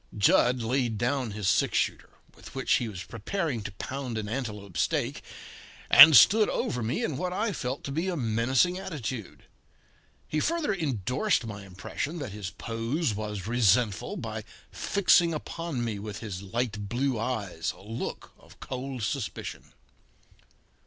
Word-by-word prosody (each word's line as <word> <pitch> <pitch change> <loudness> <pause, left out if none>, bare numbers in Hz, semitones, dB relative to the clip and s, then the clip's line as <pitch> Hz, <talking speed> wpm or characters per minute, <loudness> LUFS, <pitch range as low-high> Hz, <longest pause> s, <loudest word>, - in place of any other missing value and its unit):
Jud 120 +4 +4
laid 120 -1 0
down 125 +1 0
his 105 -1 -3
six - - +2
shooter, - - -1 0.3
with - - -13
which - - +2
he 120 - -2
was 95 -3 -7
preparing 130 - -3
to 100 - -6
pound 130 +2 -5
an 105 -1 -3
antelope 105 -6 -5
steak, - - 0 0.7
and 155 -3 +11
stood 215 - +6
over 125 - -1
me 115 +2 -1
in 150 -4 -2
what 180 0 -2
I 210 +3 -1
felt 130 -3 -4
to 140 - -5
be 165 +6 -1
a 180 -2 -1
menacing 130 +9 +2
attitude. 130 - -6 0.8
He 155 - -1
further 330 - 0
endorsed 135 - 0
my 105 -2 -7
impression 120 - -5
that 140 -9 -5
his 100 -2 -5
pose 115 - -2
was 105 -2 -4
resentful 115 -2 +2
by - - -5 0.3
fixing 175 -4 +3
upon 155 -5 -4
me 110 -3 -3
with 105 0 -6
his 100 -5 -6
light 105 0 -3
blue 125 0 0
eyes 105 -8 -2
a - - -15
look 115 +4 -5
of - - -19
cold 130 -2 -5
suspicion. 125 +2 -4
120 Hz, 150 wpm, -28 LUFS, 105-145 Hz, 0.8 s, and